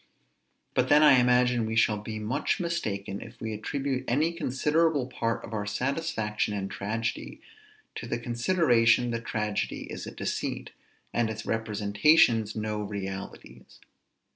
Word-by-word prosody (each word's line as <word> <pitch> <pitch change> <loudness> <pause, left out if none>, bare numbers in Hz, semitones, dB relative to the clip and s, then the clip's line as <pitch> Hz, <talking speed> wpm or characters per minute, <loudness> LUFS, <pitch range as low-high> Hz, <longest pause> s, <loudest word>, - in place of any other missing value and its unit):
But 130 0 +1
then 150 +1 +6
I 135 -4 +7
imagine 125 -1 +3
we 110 - -3
shall 110 -2 +3
be 110 +1 -6
much 115 +7 -1
mistaken 105 - -3
if 115 +1 -11
we 110 0 -4
attribute 135 +5 -2
any 155 +7 +1
considerable 150 -1 +1
part 115 -2 -2
of - - -10
our 105 -1 -3
satisfaction 110 -4 -1
in 95 -1 -3
tragedy 110 +5 -4 0.5
to - - -6
the - - -1
consideration 120 -2 +2
that 115 0 -4
tragedy 105 -2 -2
is - - -6
a - - -6
deceit, - - -4 0.4
and 120 -2 +1
its 110 0 -6
representations 110 +2 +3
no 105 -1 -2
realities. 100 -2 -7
115 Hz, 140 wpm, -28 LUFS, 105-130 Hz, 0.5 s, I